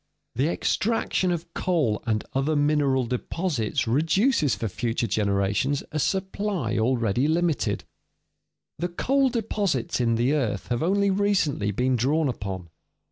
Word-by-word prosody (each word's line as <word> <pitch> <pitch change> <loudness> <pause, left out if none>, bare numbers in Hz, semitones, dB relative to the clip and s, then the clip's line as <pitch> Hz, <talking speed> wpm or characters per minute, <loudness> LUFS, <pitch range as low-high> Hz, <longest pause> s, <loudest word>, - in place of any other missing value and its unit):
The 135 +6 +1
extraction 195 0 0
of 170 -1 -4
coal 155 - 0
and 110 -2 0
other 135 +4 +1
mineral 145 -3 +2
deposits 125 - -2
reduces 155 - +2
for 110 +3 -3
future 115 +5 -2
generations 100 +6 0
a 155 - -2
supply 190 - -1
already 120 +1 +1
limited. 165 -1 0 1.0
The 175 - -1
coal 270 +9 +2
deposits 200 - -1
in 115 -1 +2
the 120 +5 +2
earth 120 -10 -1
have 120 -1 0
only 200 +4 +2
recently 190 - +1
been 125 +5 +1
drawn 145 +5 +1
upon. 95 -7 -5
140 Hz, 130 wpm, -25 LUFS, 115-175 Hz, 1.0 s, mineral